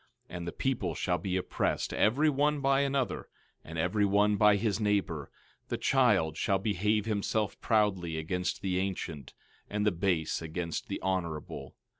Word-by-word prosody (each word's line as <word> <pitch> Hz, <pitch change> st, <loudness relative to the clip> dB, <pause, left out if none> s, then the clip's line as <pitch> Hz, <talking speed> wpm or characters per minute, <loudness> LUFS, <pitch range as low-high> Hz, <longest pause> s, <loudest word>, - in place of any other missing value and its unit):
13:5 -, -, -7 dB
And 85 Hz, 0 st, -6 dB
the -, -, -2 dB
people 100 Hz, -11 st, -1 dB
shall 90 Hz, -1 st, 0 dB
be 95 Hz, +2 st, -1 dB
oppressed, 90 Hz, -, -1 dB
every 135 Hz, +9 st, +3 dB
one 150 Hz, +1 st, +2 dB
by 135 Hz, 0 st, +3 dB
another, 135 Hz, -2 st, -1 dB, 0.4 s
and 80 Hz, +1 st, -8 dB
every 90 Hz, +6 st, +1 dB
one 105 Hz, +1 st, +3 dB
by 105 Hz, 0 st, +5 dB
his 100 Hz, 0 st, 0 dB
neighbor; 100 Hz, -9 st, 0 dB, 0.4 s
the -, -, -2 dB
child 105 Hz, -, +3 dB
shall 95 Hz, -, +2 dB
behave 105 Hz, +1 st, 0 dB
himself 105 Hz, -1 st, -1 dB
proudly 95 Hz, -7 st, +1 dB
against 90 Hz, +4 st, -2 dB
the 90 Hz, -1 st, 0 dB
ancient, 85 Hz, -7 st, -4 dB, 0.3 s
and 105 Hz, 0 st, -1 dB
the 105 Hz, -, +4 dB
base 85 Hz, -4 st, 0 dB
against 80 Hz, +1 st, -4 dB
the -, -, -3 dB
honorable. 85 Hz, -5 st, -3 dB
100 Hz, 160 wpm, -30 LUFS, 85-110 Hz, 0.4 s, by